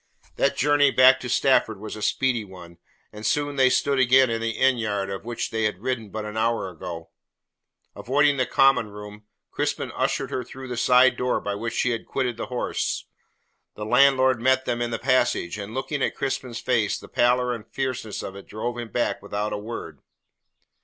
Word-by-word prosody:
That - - +1
journey 145 0 +4
back 130 0 +6
to 125 - -6
Stafford 120 -4 +2
was 110 0 -7
a 105 - -8
speedy 125 0 0
one, 90 -3 -13 0.3
and 105 0 -10
soon 145 +6 0
they 130 -1 +4
stood 140 +1 +1
again 130 0 +5
in 115 0 -2
the 115 - -1
inn 130 -2 +3
yard 100 -3 -2
out 95 - -3
of 95 - -20
which 120 0 -5
she 110 -1 -1
had 105 -3 -1
ridden 125 -5 -2
but 110 +1 -5
an 105 0 -7
hour 115 -3 0
ago. 85 -1 -8 0.8
Avoiding 145 +2 +2
the 130 -2 +1
common 125 -4 +3
room, 105 0 -11 0.3
Crispin - - -2
ushered - - -1
her 125 - -2
through 130 +1 -10
the 125 - -3
side 125 +1 +4
door 125 0 0
by 100 - -3
which 115 +3 -4
she 125 - +1
had 115 - -4
quitted 125 -3 -1
the - - -5
house. 125 0 -2 0.7
The 105 - -6
landlord 130 +1 +4
met 130 +1 +2
them 120 0 -2
in 120 - -1
the 115 - -2
passage, 120 -6 +1
and 105 +3 -7
looking 135 +2 -3
at - - 0
Crispin's 130 -3 -3
face - - 0
the - - -12
pallor 125 +1 +2
and 115 -3 -8
fierceness 130 -5 -4
of 95 - -7
it 100 - -11
drove 120 +3 -4
him 120 -1 -6
back 120 - -1
without 100 +1 -3
a - - -2
word. 115 +3 -7
120 Hz, 200 wpm, -24 LUFS, 105-130 Hz, 0.8 s, back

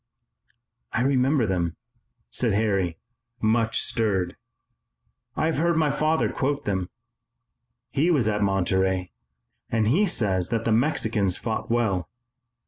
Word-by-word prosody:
"I 115 - +1
remember 135 0 +2
them," 85 -4 -1 0.6
said 115 - +1
Harry, 100 -5 0 0.4
much 110 +1 +2
stirred. 95 -6 0 1.0
"I - - 0
have 160 -2 0
heard 170 0 +2
my 155 -3 +2
father 155 +3 +1
quote 140 +1 -1
them. 95 -3 -1 1.0
He 150 +5 +2
was 140 -10 +2
at 105 -1 0
Monterey 95 -1 +1 0.6
and 110 -2 +1
he 195 - +3
says 95 - 0
that 115 -1 -1
the 115 - +1
Mexicans 110 - +1
fought 110 -1 -3
well. 100 -8 0
110 Hz, 125 wpm, -25 LUFS, 95-135 Hz, 1.0 s, he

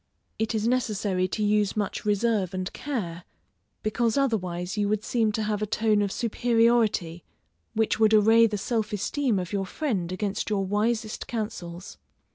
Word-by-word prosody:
It 225 +1 -1
is 215 +1 0
necessary 210 -6 0
to 210 +3 -2
use 210 0 +2
much 205 0 -2
reserve 205 -3 +1
and 185 -1 -3
care, 185 -12 -4 0.6
because 225 +2 0
otherwise 185 -9 -1
you 205 -1 0
would 215 0 0
seem 225 -2 +1
to 220 - -1
have 210 -1 -1
a 215 - -1
tone 215 0 +2
of 200 -1 0
superiority 230 -7 +1 0.5
which 220 0 +1
would 220 0 +5
array 225 +2 +6
the 210 -1 -3
self 215 +1 -2
esteem 230 +3 0
of 180 +1 -4
your 195 -2 -1
friend 195 - -2
against 200 +3 -2
your 200 -2 0
wisest 215 +2 -1
counsels. 210 -6 -5
210 Hz, 160 wpm, -26 LUFS, 195-225 Hz, 0.6 s, array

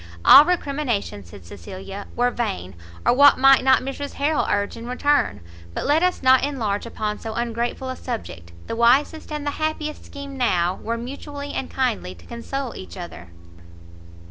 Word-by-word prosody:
"All 285 +2 +10
recrimination," 280 - -2
said 90 +1 -14
Cecilia, 185 - -9
"were 245 +1 +2
vain, 200 - -3 0.3
or - - +5
what 285 +3 +7
might 270 0 +6
not 260 -1 +4
Mrs 275 +2 -5
Harrel 295 +2 0
urge 205 0 0
in 230 0 -8
return! 285 - +1 0.3
but - - -3
let 300 +3 +3
us 360 -5 0
not 260 0 +6
enlarge 235 -7 -2
upon 210 -2 -3
so 220 -1 -6
ungrateful 235 +2 -2
a 260 - -4
subject, 85 - -7
the - - -4
wisest 265 +8 +2
and 300 -1 -4
the 290 - 0
happiest 310 -1 -2
scheme 280 -1 -9
now 180 -8 +1
were 230 +1 -2
mutually 285 +4 -7
and 265 - -3
kindly 230 - -2
to 85 - -18
console 255 +2 -5
each 190 - -9
other." 170 - -9
245 Hz, 170 wpm, -22 LUFS, 205-285 Hz, 0.3 s, All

